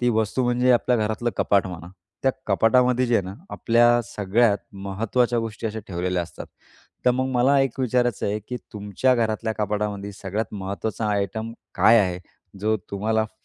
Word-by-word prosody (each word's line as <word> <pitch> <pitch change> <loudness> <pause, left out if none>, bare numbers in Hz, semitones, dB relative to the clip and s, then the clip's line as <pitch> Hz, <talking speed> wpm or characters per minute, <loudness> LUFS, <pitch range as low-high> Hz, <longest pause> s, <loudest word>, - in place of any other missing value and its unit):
ती 125 - +2
वस्तू 110 +3 0
म्हणजे 125 +1 +2
आपल्या 125 0 +2
घरातलं 110 +2 -1
कपाट 100 -1 +2
म्हणा. 85 -2 -8 0.3
त्या 135 - +4 0.2
कपाटामध्ये 125 +5 +3
जे 120 - +1
आहे 100 - +1
ना 95 +1 -7 0.2
आपल्या 120 +1 +3
सगळ्यात 105 +2 +1
महत्त्वाच्या 110 +5 -1
गोष्टी 115 0 -4
अशा 110 0 -4
ठेवलेल्या 90 0 -1
असतात. 85 - -9 0.6
तर 125 - +6
मग 130 +1 0
मला 130 +3 +4
एक 135 -2 -1
विचारायचं 125 -2 +1
आहे 105 +1 -1
की 125 - -3 0.2
तुमच्या 105 +5 +1
घरातल्या 110 -1 0
कपाटामध्ये 105 -1 -2
सगळ्यात 100 +3 -3
महत्वाचा 100 +3 -3
आयटम 105 +3 -2 0.2
काय 110 +5 +6
आहे 90 -3 -1 0.4
जो 110 +1 +1
तुम्हाला 110 +2 0
फ 110 - -11
110 Hz, 165 wpm, -24 LUFS, 100-120 Hz, 0.6 s, तर